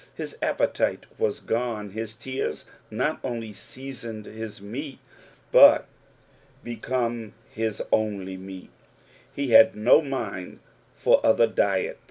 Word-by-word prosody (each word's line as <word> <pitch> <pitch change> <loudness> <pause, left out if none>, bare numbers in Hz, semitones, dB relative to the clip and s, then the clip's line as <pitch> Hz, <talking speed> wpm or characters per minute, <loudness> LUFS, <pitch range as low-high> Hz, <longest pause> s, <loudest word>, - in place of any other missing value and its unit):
His - - -6
appetite - - 0
was 450 -2 0
gone, 115 -3 -2
his 110 +1 -5
tears 130 +3 -4 0.2
not 130 +8 -1
only 115 -4 -4
seasoned 115 -1 -8
his 110 -1 -8
meat, 130 +8 -7 0.5
but - - +8 0.8
became 120 -2 -3 0.2
his 110 -1 -2
only 100 -3 0
meat, 95 0 -10 0.6
he 140 -2 -3
had 110 0 +8
no 115 +8 +5
mind 115 - -5 0.4
for - - +3
other 115 +1 +5
diet. 100 -3 0
115 Hz, 115 wpm, -25 LUFS, 105-125 Hz, 0.8 s, but